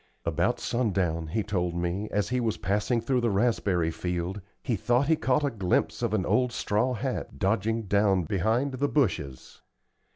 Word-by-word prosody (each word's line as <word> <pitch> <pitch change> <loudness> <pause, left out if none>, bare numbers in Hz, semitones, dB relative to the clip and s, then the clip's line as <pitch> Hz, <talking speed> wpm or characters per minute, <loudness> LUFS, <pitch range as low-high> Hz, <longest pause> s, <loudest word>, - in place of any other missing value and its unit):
About 85 +8 +1
sun 120 -4 0
down, 85 -4 0
he 110 +7 -1
told 90 -4 -1
me, 90 +4 -2
as 105 -1 0
he 125 0 0
was 115 -3 -1
passing 105 +4 0
through 125 +2 +1
the 120 - +2
raspberry 100 -6 +1
field, 90 +3 -3 0.2
he 120 - 0
thought 120 +7 +1
he 160 - +4
caught 145 0 +1
a 140 - 0
glimpse 100 -6 0
of - - +1
an - - 0
old 125 -1 +2
straw 125 +3 0
hat 130 +2 -4
dodging 110 +3 0
down 100 -2 +2
behind 110 - 0
the 135 +2 0
bushes. 90 - -1
105 Hz, 175 wpm, -27 LUFS, 90-125 Hz, 0.2 s, he